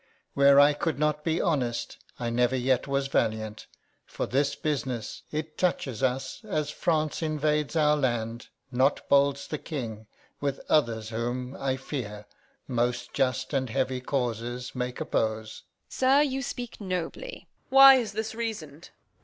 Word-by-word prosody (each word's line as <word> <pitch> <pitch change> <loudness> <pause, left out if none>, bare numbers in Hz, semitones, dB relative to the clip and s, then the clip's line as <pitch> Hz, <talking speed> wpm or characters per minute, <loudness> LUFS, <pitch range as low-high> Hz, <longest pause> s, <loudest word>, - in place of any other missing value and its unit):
Where 140 0 +6
I 145 +1 +7
could 155 +1 -2
not 150 0 0
be 165 0 0
honest, 130 -8 -1 0.2
I 120 -1 -2
never 125 +2 +2
yet 130 0 +1
was 140 0 0
valiant. 110 -4 -1 0.4
For - - -4
this 140 +2 +1
business, 130 -7 -3
It 155 0 -4
toucheth 135 -10 0
us 130 - -1
as 155 -8 -2
France 155 -2 0
invades 150 -1 0
our 150 -1 +4
land, 120 -4 -1 0.2
Not 130 +3 +1
bolds 140 0 +3
the 150 - -4
King, 110 -8 -6 0.3
with 140 -1 -2
others 115 -7 +1
whom, 120 +3 -3
I 135 -1 -1
fear, 105 -7 -6 0.4
Most 120 0 -1
just 130 +1 0
and 130 -2 0
heavy 130 +1 -1
causes 120 -2 -3
make 125 -1 -3
oppose. 110 0 -2 0.2
Edm. - - -16
Sir, 265 +2 +4
you 270 -2 -1
speak 245 -3 -6
nobly. 185 - -4
Reg. - - -45
Why 270 0 +10
is 225 -5 -2
this 220 +1 -3
reason'd? 175 -10 -5
135 Hz, 150 wpm, -27 LUFS, 125-155 Hz, 0.4 s, Why